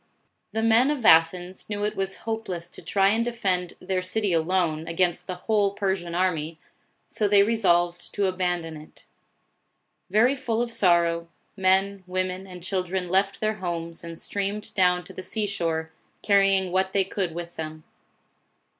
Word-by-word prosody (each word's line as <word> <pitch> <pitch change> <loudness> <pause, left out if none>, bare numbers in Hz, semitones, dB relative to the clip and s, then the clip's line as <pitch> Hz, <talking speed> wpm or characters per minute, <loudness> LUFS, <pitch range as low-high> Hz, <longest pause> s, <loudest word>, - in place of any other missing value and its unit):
The 220 - -2
men 230 +4 +4
of 285 -6 -2
Athens 175 +3 +3
knew 205 -1 -3
it 210 - -1
was 195 0 -1
hopeless 220 -7 -4
to - - -11
try 195 -1 +2
and 225 +3 +2
defend 190 -7 -1
their 185 0 -2
city 190 +1 0
alone, 165 -1 0
against 175 +1 0
the 185 - -3
whole 205 -3 +2
Per 195 -2 +1
sian 175 -2 -7
army, 165 -3 -1 0.5
so 210 - 0
they 200 0 +6
resolved 175 -6 +1
to 205 - +1
abandon 180 -3 -1
it. 150 +1 -15 1.0
Very 225 +7 +4
full 240 -4 -2
of 235 -1 -1
sorrow, 170 -3 +3 0.3
men, 195 0 +2
women, 185 +1 -3
and 180 -2 -10
children 185 -1 -2
left 195 +2 +1
their 215 0 0
homes 170 -3 -4
and 165 -1 -8
streamed 205 +3 -3
down 180 -3 +3
to - - -12
the - - -7
sea 215 +3 -2
shore, 165 -5 -2 0.3
carry 195 -1 +4
ing 190 -2 -2
what 190 +1 0
they 195 - +3
could 185 -3 -3
with 170 0 -6
them. 155 0 -6
185 Hz, 165 wpm, -25 LUFS, 175-205 Hz, 1.0 s, they